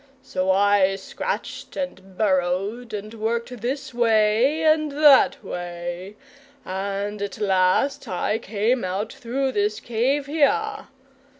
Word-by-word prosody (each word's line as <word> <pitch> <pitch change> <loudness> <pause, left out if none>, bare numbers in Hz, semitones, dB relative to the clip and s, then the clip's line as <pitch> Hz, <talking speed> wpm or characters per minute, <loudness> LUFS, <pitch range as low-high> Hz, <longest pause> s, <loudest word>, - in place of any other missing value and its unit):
So 185 0 -2
I 195 0 +4
scratched 195 - -5
and 195 -10 -6
burrowed, 200 +4 0
and 210 +1 -6
worked 230 +1 -3
this 260 +2 -3
way 235 +5 +3
and 310 -1 +3
that 290 -5 +5
way 175 +1 -6 0.5
and 200 +2 -3
at 205 +2 -4
last 200 +7 +1
I 210 +3 -1
came 225 +3 0
out 190 +3 -3
through 265 +3 -2
this 210 -1 0
cave 250 +6 0
here. 425 +9 0
215 Hz, 115 wpm, -23 LUFS, 195-260 Hz, 0.5 s, that